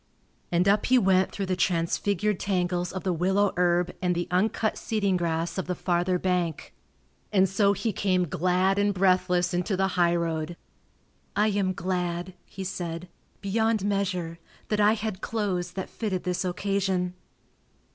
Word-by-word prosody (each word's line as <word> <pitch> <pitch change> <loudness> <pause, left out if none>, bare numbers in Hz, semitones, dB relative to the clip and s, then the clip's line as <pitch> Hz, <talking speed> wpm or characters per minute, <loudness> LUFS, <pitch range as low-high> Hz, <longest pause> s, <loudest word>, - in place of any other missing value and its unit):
And 175 +2 +2
up 200 +1 +3
he 255 - +5
went 190 -4 +3
through 200 - -3
the 185 0 -1
transfigured 180 +3 0
tangles 180 -2 -1
of 190 - -5
the 185 - 0
willow 190 +4 +2
herb 175 0 +2
and 180 -1 +1
the 175 0 -2
uncut 215 +4 +1
seeding 200 -4 0
grass 170 0 -1
of 185 - -3
the 180 - -1
farther 180 +1 +1
bank. 180 -3 -1 0.6
And 190 -2 +4
so 200 +1 +3
he 220 +2 -2
came 185 -2 +1
glad 185 +5 +1
and 205 -1 +2
breathless 180 -1 +2
into 180 +2 0
the 190 0 +2
highroad. 170 -2 0 0.8
"I 210 +2 +3
am 195 -2 0
glad," 180 0 -2
he 195 - -7
said, 175 -2 -5 0.3
"beyond 220 +1 +1
measure, 185 -5 -1 0.3
that 210 - 0
I 210 +1 +5
had 215 -3 -4
clothes 185 -5 -2
that 190 0 -4
fitted 195 -5 -3
this 180 0 -1
occasion." 185 -1 -1
185 Hz, 155 wpm, -27 LUFS, 175-200 Hz, 0.8 s, he